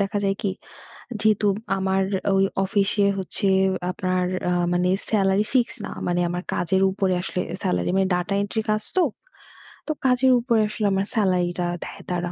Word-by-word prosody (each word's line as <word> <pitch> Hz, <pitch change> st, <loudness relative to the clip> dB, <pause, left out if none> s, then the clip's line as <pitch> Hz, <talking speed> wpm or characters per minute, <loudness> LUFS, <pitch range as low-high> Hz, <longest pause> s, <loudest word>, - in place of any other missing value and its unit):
দেখা 200 Hz, +1 st, 0 dB
যায় 195 Hz, 0 st, +1 dB
কি 200 Hz, -, 0 dB, 0.7 s
যেহেতু 215 Hz, -1 st, +2 dB, 0.3 s
আমার 190 Hz, 0 st, +1 dB, 0.3 s
ঐ -, -, +3 dB, 0.3 s
অফিসে 200 Hz, +1 st, +1 dB
হচ্ছে 195 Hz, +1 st, -1 dB, 0.4 s
আপনার 185 Hz, -2 st, -1 dB, 0.3 s
আ -, -, +1 dB, 0.2 s
মানে 180 Hz, +1 st, +1 dB, 0.2 s
সেলারি 200 Hz, 0 st, +2 dB
ফিক্সড 245 Hz, -3 st, +1 dB
না। -, -, -6 dB, 0.2 s
মানে 175 Hz, 0 st, +1 dB
আমার 175 Hz, +1 st, -3 dB
কাজের 190 Hz, +2 st, +1 dB
উপরে 190 Hz, -1 st, 0 dB
আসলে 180 Hz, 0 st, -3 dB, 0.2 s
সেলারি 90 Hz, 0 st, 0 dB
মানে 195 Hz, 0 st, +3 dB
ডাটা 180 Hz, +3 st, -1 dB
এন্ট্রি 220 Hz, +2 st, -2 dB
কাজ 215 Hz, 0 st, -1 dB
তো। 355 Hz, -, +5 dB, 0.9 s
তো 310 Hz, -, +2 dB
কাজের 260 Hz, 0 st, +4 dB
উপরে 235 Hz, -2 st, +2 dB
আসলে 215 Hz, 0 st, -3 dB
আমার 195 Hz, +1 st, 0 dB
সেলারিটা 180 Hz, -3 st, +1 dB, 0.2 s
দেয় -, -, -9 dB
তারা। 175 Hz, 0 st, -2 dB
195 Hz, 160 wpm, -23 LUFS, 180-210 Hz, 0.9 s, তো